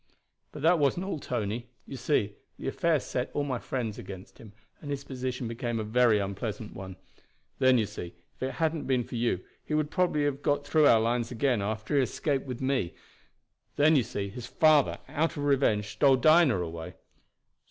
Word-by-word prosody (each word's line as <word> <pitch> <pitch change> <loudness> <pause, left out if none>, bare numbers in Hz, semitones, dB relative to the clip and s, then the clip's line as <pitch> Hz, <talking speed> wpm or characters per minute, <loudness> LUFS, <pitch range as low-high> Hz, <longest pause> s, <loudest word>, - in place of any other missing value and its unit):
"But 150 - -9
that 170 +1 +5
wasn't 145 +6 +1
all, 195 -6 -3
Tony. 120 -1 -3 0.2
You - - -8
see, 105 -7 0 0.2
the - - -6
affair 165 +2 +1
set 125 -1 -3
all 145 - +1
my 130 -4 -2
friends 115 -5 -4
against 95 -1 -10
him, 110 -3 -12 0.3
and 145 - -8
his 140 -1 -3
position 130 -2 -4
became 115 0 -3
a - - -2
very 115 0 +3
unpleasant 105 +2 -4
one. 95 -1 -8 0.6
Then, 130 -1 +5
you 110 - +2
see, 90 -5 -8 0.2
if - - -34
it 130 +1 -2
hadn't 160 -1 -1
been 130 -2 +2
for - - -12
you 115 -6 0 0.2
he 150 - -2
would 155 0 0
probably 175 -4 +1
have 145 -1 -1
got 145 0 0
through 155 +1 +3
to - - +7
our 115 - +5
lines 115 +1 0
again 125 -2 +1
after 110 +4 -3
he 145 - +4
had 130 - +1
escaped 140 -3 -1
with 125 -1 -5
me. 130 -9 0 0.8
Then, 155 +2 +5
you 135 - +5
see, 100 -3 -4
his 120 +4 -8
father, 150 +2 +4
out 160 +1 -1
of 145 - -3
revenge, 120 -8 +2
stole 130 +6 +4
Dinah 155 - +5
away." 80 -1 -7
130 Hz, 200 wpm, -28 LUFS, 110-145 Hz, 0.8 s, to